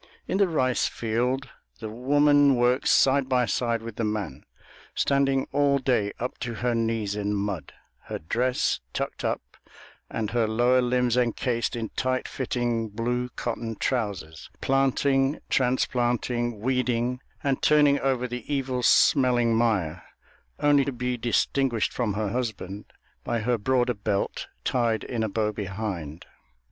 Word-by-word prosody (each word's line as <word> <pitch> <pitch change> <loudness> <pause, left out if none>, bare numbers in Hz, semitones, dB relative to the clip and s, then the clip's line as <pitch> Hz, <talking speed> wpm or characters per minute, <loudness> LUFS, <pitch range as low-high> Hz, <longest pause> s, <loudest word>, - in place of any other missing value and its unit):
In 190 - -1
the 200 - +5
rice 130 -7 +1
field 125 +4 -1 0.3
the 110 - -5
woman 145 +4 +4
works 125 +2 +2
side 135 0 +4
by 125 -1 +3
side 115 +2 -1
with 115 -2 -8
the - - -1
man, 105 -10 -3 0.5
standing 135 -1 +2
all 140 -1 +3
day 125 -6 +1
up 125 - -4
to 120 -2 -4
her 120 +1 0
knees 115 -3 -1
in 105 0 -1
mud, 100 -7 -3 0.3
her - - -4
dress 125 +9 0
tucked - - -4
up - - -1 0.7
and 110 -2 -3
her 115 -1 +1
lower 120 +3 +3
limbs 125 -1 +1
encased 120 0 0
in 115 -2 -3
tight 130 -1 -1
fitting, 120 -3 -2
blue 120 +3 -2
cotton 115 -1 -3
trousers, 100 -11 -3
planting, 135 +1 +2
transplanting, 120 -2 0
weeding, 125 0 0 0.2
and 135 -2 0
turning 145 -2 +4
over 130 -2 0
the 125 +3 -6
evil 130 -3 -1
smelling 120 -2 +4
mire, 95 -8 +1 0.6
only 145 -1 +4
to 140 - -2
be 125 0 -2
distinguished 120 0 0
from 110 -5 -1
her 105 -1 -1
husband 105 -4 -4 0.4
by 115 - -1
her 120 +2 +1
broader 125 +2 +1
belt 100 -2 -2 0.2
tied 115 -3 0
in 120 -3 -3
a 110 - 0
bow 105 +1 0
behind. 95 -6 -5
120 Hz, 140 wpm, -26 LUFS, 110-130 Hz, 0.7 s, the